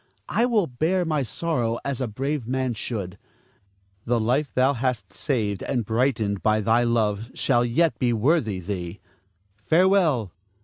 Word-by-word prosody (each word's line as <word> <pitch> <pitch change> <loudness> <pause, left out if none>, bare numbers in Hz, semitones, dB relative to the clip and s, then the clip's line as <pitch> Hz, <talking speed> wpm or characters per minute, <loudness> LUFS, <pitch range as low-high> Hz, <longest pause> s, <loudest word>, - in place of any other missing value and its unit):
I 235 - +2
will 220 -6 +2
bear 165 +7 0
my 155 -3 0
sorrow 120 -2 -1
as 140 -2 -2
a 130 - 0
brave 135 +3 -3
man 130 -1 -1
should. 100 -4 -5 0.9
The 120 0 +1
life 130 +6 0
thou 130 +2 +3
hast 120 -6 -2
saved 105 -9 -2
and 120 -5 -2
brightened 110 -3 0
by 110 0 +2
thy 115 +3 +3
love 115 -2 0
shall 120 -3 +2
yet 145 +7 +1
be 125 -2 +2
worthy 115 - +1
thee. 90 0 -5 0.6
Farewell! 160 - +2
120 Hz, 145 wpm, -24 LUFS, 110-140 Hz, 0.9 s, thou